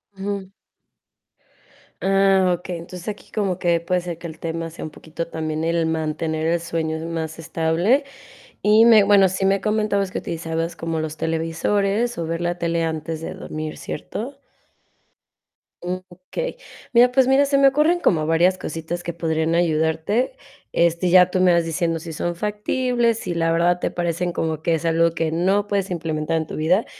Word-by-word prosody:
Ujú. 195 -1 -4 1.5
Ah, 195 -1 +3
okey, 180 -1 -5
entonces, 175 +1 -9
aquí 210 -1 -6
como 195 -4 -1
que 170 -2 +2
puede 180 +2 -1
ser 170 -2 -6
que 170 - -6
el 160 - -10
tema 165 0 -4
sea 165 - -8
un 155 - -7
poquito 160 +2 -6
también 155 -1 -3
el 165 0 +1
mantener 160 0 -2
el 170 +1 +2
sueño 160 -1 -2
más 160 -1 -4
estable. 165 - +1 0.6
Y 215 +2 +6
me 225 -3 +7
bueno, 200 -2 +5
sí 190 +1 -1
me 195 0 +2
comentabas 210 -2 0
que - - -3
utilizabas 165 0 -3
como 165 -1 -3
los 155 0 -4
televisores 195 +8 0
o 165 - -2
ver 165 +1 -3
la 175 0 -1
tele 170 -1 0
antes 160 0 -3
de 165 - -6
dormir, 155 0 -6
¿cierto? 265 - -6 1.4
Okey. 185 - -5 0.4
Mira, 245 +1 +6
pues 260 0 +4
mira, 270 +2 +5
se 280 0 +2
me 275 - +7
ocurren 300 +6 +3
como 160 - +2
varias 170 +4 +3
cositas 165 +2 -5
que 170 - -4
podrían 160 -1 0
ayudarte, 165 - +1 0.4
este, 170 +1 +2
ya 180 0 +7
tú 185 - 0
me 185 -1 +5
vas 170 -1 +2
diciendo 165 0 -1
si 160 0 -8
son 175 +2 -2
factibles, 230 +4 0
si 180 - -4
la 165 0 +1
verdad 175 +2 +2
te - - -1
parecen 175 0 -1
como 160 -2 -2
que 170 - +2
es 165 - -4
algo 165 0 +3
que 165 -1 -1
no 190 +5 +1
puedes 200 -2 -1
implementar 160 -1 -1
en 160 -1 -2
tu - - -6
vida 175 +7 +2
170 Hz, 175 wpm, -22 LUFS, 165-195 Hz, 1.5 s, me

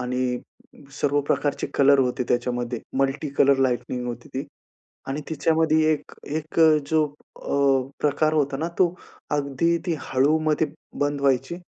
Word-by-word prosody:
आणि 125 0 -1 0.6
सर्व 145 0 +2
प्रकारचे 145 -1 0
कलर 140 0 +5
होते 125 -1 +1
त्याच्यामध्ये. 120 -1 -1 0.2
मल्टी 135 +2 0
कलर 140 0 +5
लाइटिंग 125 0 -3
होती 120 +5 -6
ती. 135 +3 -3 0.6
आणि 135 +3 -2
तिच्यामध्ये 160 0 +2
एक 150 -1 -5 0.2
एक 155 +1 -2
अ, 160 - +8 0.2
जो 160 -1 +4 0.4
अ, 135 -2 +2
प्रकार 150 +1 +2
होता 140 -3 +1
ना, 160 +4 -2
तो 180 -2 +3 0.4
अगदी 145 +4 +1
ती 170 - +1 0.2
हळूमध्ये 155 +3 +2 0.4
बंद 145 0 -1
व्हायची 140 +4 +1
140 Hz, 140 wpm, -24 LUFS, 130-155 Hz, 0.6 s, अ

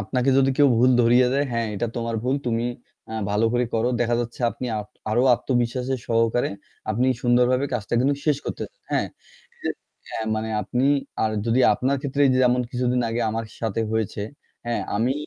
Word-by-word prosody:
আপনাকে 125 +6 0
যদি 135 0 +4
কেউ 145 -1 +6
ভুল 125 +2 +5
ধরিয়ে 120 +2 +5
দেয়, 140 +1 +1
হ্যাঁ 115 -1 0
এটা 110 +4 -1
তোমার 115 -1 -2
ভুল 130 +2 +1
তুমি 115 0 0 0.5
আ - - -6 0.2
ভালো 105 +2 +2
করে 125 0 +2
করো। 115 +2 +2
দেখা 120 0 +2
যাচ্ছে 120 +1 -6
আপনি 125 - -6
আ - - -1 0.3
আরো 120 +3 +3
আত্মবিশ্বাসের 125 +1 -1
সহকারে 115 +1 +1 0.4
আপনি 120 +4 +1 0.2
সুন্দরভাবে 125 +2 +3
কাজটা 115 -2 -2
কিন্তু 140 +3 +2
শেষ 150 -2 +3
করতে, - - -4 0.3
হ্যাঁ। - - +1 1.0
হ্যাঁ, 110 - -4
মানে 110 +1 -3
আপনি 125 +6 -1 0.4
আর 110 - +1
যদি 115 +2 +2
আপনার 135 +2 0
ক্ষেত্রে 140 0 -1
এইযে 130 -1 +3
যেমন 125 0 +3
কিছুদিন 125 0 0
আগে 115 +1 -1
আমার 115 +1 -3 0.2
সাথে 115 -1 -1
হয়েছে, 110 -2 -1 0.4
হ্যাঁ 120 -3 -1 0.2
আমি 120 +5 +1
120 Hz, 175 wpm, -24 LUFS, 115-130 Hz, 1.0 s, কেউ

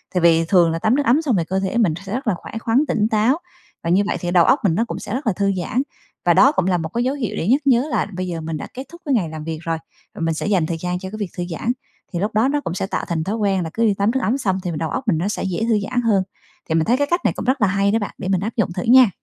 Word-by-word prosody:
tại 180 - +2
vì 165 -1 +4
thường 170 -2 +4
là 165 - -2
tắm 220 +8 +2
nước 290 - +1
ấm 265 +7 +4
xong 265 -9 +1
thì - - +1
cơ 190 0 +1
thể 195 +4 -2
mình 205 -9 +3
sẽ 195 - -5
rất 255 +1 -3
là 210 - +3
khỏe - - -11
khoắn, 245 +6 +2
tỉnh 210 -1 +1
táo 225 +7 +3 0.5
và 165 - -2
như 190 +3 +4
vậy - - -1
thì 175 - -3
đầu 175 -2 +5
óc 275 - +4
mình 180 -6 +2
nó 230 +5 +1
cũng - - -5
sẽ - - -6
rất 260 +1 -3
là 215 - +3
thư 200 +1 +1
giãn. 245 +8 0 0.4
Và 175 - +5
đó 255 +10 +6
cũng 190 - 0
là 180 -2 +2
một 160 -1 -4
cái 235 - 0
dấu 260 +3 0
hiệu 240 -9 -3
để 170 - -2
nhắc 270 +6 +4
nhớ 260 +2 +4
là - - 0
bây 185 0 -3
giờ 170 -2 -4
mình 160 0 -4
đã - - -6
kết 260 - -6
thúc 340 0 -13
cái 285 - +1
ngày 180 -8 0
làm 155 -1 -7
việc 160 -1 -3
rồi, 165 -1 -2 0.4
và - - -7
mình 165 0 +1
sẽ - - -3
dành 190 -6 +2
thời 165 +1 -3
gian 180 0 -2
cho 190 - -6
cái 215 - -6
việc 205 -4 -3
thư 175 - -1
giãn, 200 +8 -1 0.4
thì 170 - -1
lúc 205 +4 -1
đó 225 +5 +4
nó 290 +1 0
cũng 170 - -4
sẽ 190 - -2
tạo - - -3
thành 165 -3 -1
thói 205 +5 -2
quen 195 -4 +1
là 165 - -4
cứ 230 - 0
đi 210 - +3
tắm 200 +3 +1
nước 265 - 0
ấm 250 +5 +1
xong 190 -7 0
thì 180 - -2
đầu 160 0 -2
óc 260 - -4
mình 170 - +3
nó 175 +5 -1
sẽ - - -3
dễ 190 +3 -2
thư 220 -2 +3
giãn 250 -1 0
hơn. 210 -5 +2 0.5
Thì 160 - +1
mình 160 - +3
thấy 245 +3 +3
cái 285 - +1
cách 345 0 +1
này - - +3
cũng - - -5
rất 260 -1 +1
là 205 - +5
hay 200 +1 +2
đó 225 - +2
bạn, 205 - -5
để 185 - -5
mình 190 -2 +1
áp 220 +3 -4
dụng 190 -6 +1
thử 180 - -3
nha. 250 -2 +7
200 Hz, 350 wpm, -21 LUFS, 175-235 Hz, 0.5 s, nha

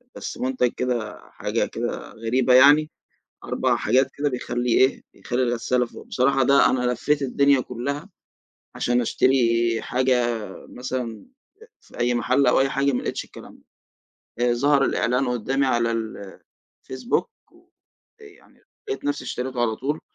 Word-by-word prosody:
بس - - -6
منتج 125 -1 0
كده 120 -4 -3
حاجة - - -2
كده - - -5
غريبة 120 +3 +1
يعني، 145 +4 +6 0.6
4 - - 0
حاجات 130 +1 +2
كده 145 0 0
بيخلّي 125 -1 -3
إيه 130 +1 +2
بيخلّي 125 +1 -2
الغسالة 125 +1 0
فوق، - - -13
بصراحة 135 +1 +1
ده 140 +2 +5
أنا 125 -1 0
لفيت 145 +4 0
الدنيا 140 0 +3
كلّها 140 - -5 0.7
عشان 120 0 +1
أشتري 115 -2 +2
حاجة 125 -2 +1 0.3
مثلًا، 125 -3 -5 0.5
في - - -17
أي 120 0 +2
محل 130 +3 +2
أو 125 - +4
أي 135 - +3
حاجة 140 0 +1
ما 125 - -2
لقيتش - - -3
الكلام - - -14 0.8
ده، 120 0 +2
ظهر 140 +2 +3
الإعلان 125 +3 0
قدّامي 125 +3 0
على 120 -2 +1
ال 110 -4 -6 0.4
الفيسبوك 130 - -2 0.9
يعني 420 -1 -18 0.3
لقيت 405 -8 -4
نفسي 290 0 -2
اشتريته 125 0 -4
على 110 -2 0
طول 145 +4 -3
125 Hz, 140 wpm, -23 LUFS, 120-135 Hz, 0.9 s, يعني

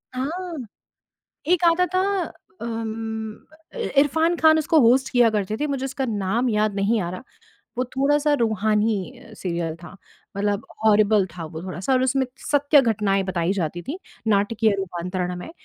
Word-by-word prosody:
हाँ। 330 +6 -4 0.9
एक 355 0 +2
आता 340 +2 +4
था 370 - +3 0.6
अम, 225 -1 -4 0.4
अ, - - -9
इ 465 - -2
इरफ़ान 320 +4 +2
खान 315 -1 +5
उसको 315 +1 +3
होस्ट 260 +2 +4
किया 245 -2 +5
करते 210 0 -1
थे, 300 - -1
मुझे 275 -2 -2
उसका 270 0 -3
नाम 215 +3 0
याद 210 -1 +1
नहीं 205 +3 +1
आ 175 -2 -3
रहा। 185 - -7 0.6
वो 255 - +2
थोड़ा-सा 285 +4 +1
रूहानी 220 +1 0 0.2
सीरियल 170 -3 -3
था, 175 +2 -12 0.4
मतलब 205 +1 -1 0.2
हॉरिबल 210 -2 +4
था 170 - -5
वो 160 +1 -7
थोड़ा-सा 185 +7 -3
और 255 - +3
उसमें 260 +1 +2 0.3
सत्य 290 0 +5
घटनाएँ 210 -4 +1
बताई 180 -1 0
जाती 175 -3 -3
थी, 290 - -5 0.3
नाटकीय 210 +1 +2
रूपांतरण 180 -1 -3
में। 180 - -8
220 Hz, 155 wpm, -23 LUFS, 195-270 Hz, 0.9 s, खान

